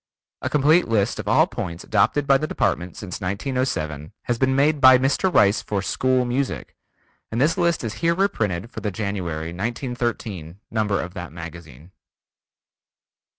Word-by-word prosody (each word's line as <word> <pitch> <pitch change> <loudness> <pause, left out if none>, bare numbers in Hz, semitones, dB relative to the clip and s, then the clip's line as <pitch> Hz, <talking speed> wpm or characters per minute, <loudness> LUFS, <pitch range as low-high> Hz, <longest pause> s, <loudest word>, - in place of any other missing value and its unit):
A - - -2
complete 155 +4 +4
list 110 -1 +1
of 105 - -5
all 150 +10 +5
points 90 - -6
adopted 110 +8 +2
by 135 -1 +4
the 155 - -2
Department 85 - -1
since 105 -5 -7
1907 95 - -2
has 120 -1 -2
been 130 0 +2
made 145 +1 +2
by 130 0 +9
Mr. 135 +9 +1
Rice 100 - +4
for 100 -2 -2
School 130 +4 +1
Music, 130 +3 -2 0.6
and 115 - -2
this 150 +5 +3
list 170 -5 +1
is 110 -2 -3
here 170 0 +3
reprinted 115 - -1
from - - -7
the 105 - -1
January, 90 -6 -3
1913, 110 - -4
number 105 -2 0
of 90 - -5
that 90 -3 -7
magazine. 85 -2 -10
110 Hz, 155 wpm, -23 LUFS, 90-135 Hz, 0.6 s, by